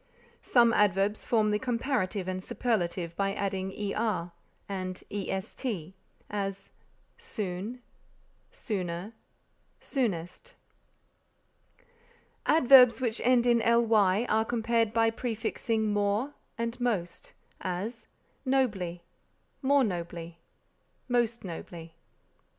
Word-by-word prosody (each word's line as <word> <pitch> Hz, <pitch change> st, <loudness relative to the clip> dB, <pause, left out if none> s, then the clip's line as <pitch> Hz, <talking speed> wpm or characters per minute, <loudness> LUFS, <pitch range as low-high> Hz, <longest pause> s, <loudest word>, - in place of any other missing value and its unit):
Some 235 Hz, -2 st, +4 dB
adverbs 205 Hz, 0 st, +2 dB
form 215 Hz, -3 st, +3 dB
the 210 Hz, -, +1 dB
comparative 230 Hz, -6 st, -1 dB
and 185 Hz, 0 st, -3 dB
superlative 175 Hz, -8 st, -1 dB
by 195 Hz, 0 st, 0 dB
adding 190 Hz, -1 st, -2 dB, 0.2 s
er 195 Hz, -6 st, -1 dB, 0.4 s
and 185 Hz, -2 st, -5 dB
est; 195 Hz, +1 st, -4 dB, 0.7 s
as, 195 Hz, -1 st, -4 dB, 0.5 s
soon, 215 Hz, -, -5 dB, 0.7 s
sooner, 185 Hz, -2 st, -4 dB, 0.7 s
soonest. 190 Hz, -, -3 dB, 1.9 s
Adverbs 260 Hz, -5 st, +7 dB
which 235 Hz, -3 st, -1 dB
end 245 Hz, 0 st, +4 dB
in 240 Hz, -1 st, +4 dB
ly 225 Hz, -3 st, +3 dB
are 220 Hz, +1 st, +3 dB
compared 230 Hz, -1 st, +1 dB
by 225 Hz, 0 st, +3 dB
prefixing 225 Hz, -2 st, -1 dB
more 205 Hz, +7 st, 0 dB, 0.2 s
and 230 Hz, +1 st, -3 dB
most; 205 Hz, -9 st, -2 dB, 0.3 s
as, 195 Hz, +6 st, -4 dB, 0.4 s
nobly, 210 Hz, -11 st, 0 dB, 0.6 s
more 280 Hz, 0 st, +4 dB
nobly, 170 Hz, -4 st, -4 dB, 0.7 s
most 240 Hz, -2 st, +1 dB
nobly. 170 Hz, -2 st, -8 dB
215 Hz, 90 wpm, -29 LUFS, 185-235 Hz, 1.9 s, Adverbs